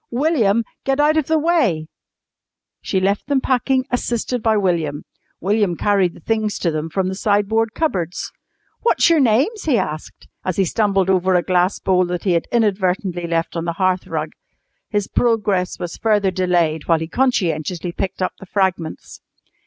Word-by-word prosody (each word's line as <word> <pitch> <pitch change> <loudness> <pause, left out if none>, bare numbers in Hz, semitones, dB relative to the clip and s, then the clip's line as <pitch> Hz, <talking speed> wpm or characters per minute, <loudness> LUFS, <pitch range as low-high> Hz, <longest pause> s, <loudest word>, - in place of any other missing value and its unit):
William, 235 -5 +2 0.2
get 270 +1 0
out 300 +1 +4
of 315 -3 +1
the 320 - +2
way!" 295 - +1 1.0
She 190 - -1
left 200 +4 0
them 285 -2 +2
packing, 260 0 +1
assisted 245 0 -1
by 220 -1 +2
William. 165 -7 0 0.4
William 200 -1 +1
carried 195 -4 +1
the - - -13
things 215 +3 -1
to 170 - 0
them 155 +1 -3
from 185 +3 -1
the 190 - -2
sideboard 215 +2 +1
cupboards. 185 - -2 0.5
"What's 460 -7 +3
your 330 - +4
names?" 275 - +2
he 285 -7 +3
asked, 155 -5 -5 0.2
as 185 - -2
he 195 - +2
stumbled 195 -1 +1
over 185 0 +2
a 175 - +3
glass 180 +1 +1
bowl 185 -1 +1
that 175 -1 -3
he 190 - +1
had 170 -1 0
inadvertently 190 -5 0
left 165 0 -1
on 165 0 -2
the 170 - -1
hearth 185 -1 +1
rug. - - -3 0.6
His 205 -2 -1
progress 210 -6 0
was 175 -1 -6
further 205 -3 +2
delayed 175 -4 0
while 165 - +4
he 160 0 -4
conscientiously 175 - 0
picked 185 +1 -3
up - - -1
the 195 - -12
fragments. 185 -4 -2
195 Hz, 170 wpm, -20 LUFS, 175-230 Hz, 1.0 s, out